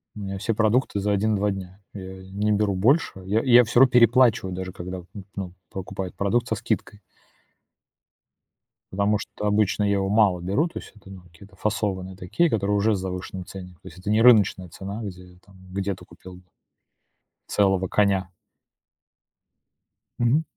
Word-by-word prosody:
У - - -8
меня 100 -1 -5
все 100 +4 -1
продукты 110 0 +1
за 105 +1 0
1-2 105 0 +1
дня, 95 0 -8
я 95 -1 -9
не 105 +2 0
беру 105 -1 +1
больше, 130 - +3
я 105 +4 +1
я 125 -2 +7
всё 120 +1 +1
равно 135 -1 +6
переплачиваю, 120 -5 +4
даже 95 0 -5
когда 90 +1 -7
н 90 -1 -11 0.3
ну, 95 -3 -5 0.2
покупаю 95 -1 -6
продукт 110 +6 0
со 110 - -1
скидкой. 105 0 -3 1.9
Потому 100 +2 +1
что 105 - -7
обычно 105 0 +2
я 100 0 +2
его 100 -1 0
мало 100 -4 +3
беру, 100 - 0
то 170 - -7
есть - - -13
это, 100 -2 -16
ну, 95 -1 -11
какие-то 90 +3 -18
фасованные 95 -3 -2
такие, 95 - 0
которые 105 -4 0
уже 105 +1 +2
с - - -3
завышенным 90 0 -5
ценником, 90 -3 -11
то - - -13
есть 90 0 -12
это 95 - -5
не 110 +1 +3
рыночная 105 -6 +5
цена, 100 +6 -7
где 90 -2 -9
там 95 -1 -19 0.2
где 100 0 -1
ты - - -13
купил 90 -1 -13 1.1
целого 95 -2 +2
коня. 95 -2 +1 1.9
Мгм. 125 +7 +3
100 Hz, 165 wpm, -24 LUFS, 95-105 Hz, 1.9 s, я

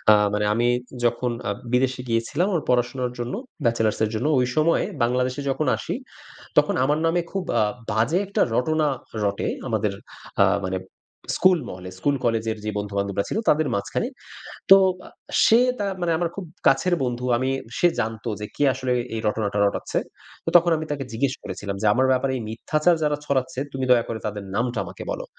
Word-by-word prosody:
আ - - +10 0.2
মানে 105 - +1
আমি 120 +1 +2 0.4
যখন 120 +1 +1 0.2
আ - - +1 0.2
বিদেশে 130 0 +2
গিয়েছিলাম 115 +10 0
আমার 165 -5 +1
পড়াশোনার 125 0 +1
জন্য, 120 +1 -3 0.3
ব্যাচেলার্সের 110 -2 +1
জন্য। 120 +7 -1
ওই 125 - +3
সময়ে 160 +2 +3 0.2
বাংলাদেশে 125 +2 +1
যখন 150 +3 -1
আসি - - -4 0.6
তখন - - +4
আমার 150 +3 +2
নামে 175 +2 +2
খুব 195 -1 -1 0.2
আ - - +4 0.3
বাজে 115 - +2
একটা 200 - -2
রটনা 155 +4 +2 0.3
রটে 100 -1 0 0.2
আমাদের 105 -3 0 0.5
আ - - +7 0.2
মানে 95 0 -2 0.6
স্কুল 185 -1 +5
মহলে। 90 0 -8
স্কুল-কলেজের 115 -3 0
যে 110 - -1
বন্ধু-বান্ধবরা 100 -1 -2
ছিল - - -1
তাদের 150 -1 +3
মাঝখানে। 100 - -1 0.6
তো 195 - +12 0.7
সে 225 +2 +6 0.2
তা 205 - 0 0.2
মানে 175 -1 +1
আমার 170 -1 0
খুব 195 - -5 0.2
কাছের 155 +7 +3
বন্ধু। 125 0 -2
আমি 130 +2 0 0.3
সে 175 - +6
জানতো 110 +1 -2
যে 105 - -4
কে - - 0
আসলে 130 -1 -3
এ - - -1
এই - - -2
রটনাটা 105 -1 -1
রটাচ্ছে। 100 - -1 0.5
তো - - +1
তখন 170 0 +2
আমি 155 - -4
তাকে 140 -2 -2
জিজ্ঞেস 130 +3 0
করেছিলাম 100 -1 -5
যে, - - -1
"আমার 130 +2 +3
ব্যাপারে 130 +1 +1
এই - - -5
মিথ্যাচার 155 +9 +1
যারা 150 -1 +1
ছড়াচ্ছে 130 -2 -1
তুমি 130 -1 -2
দয়া 120 -2 +5
করে 115 - -3
তাদের 105 -1 -5
নামটা 120 0 0
আমাকে - - -8
বলো।" - - -4
125 Hz, 175 wpm, -24 LUFS, 110-150 Hz, 0.7 s, তো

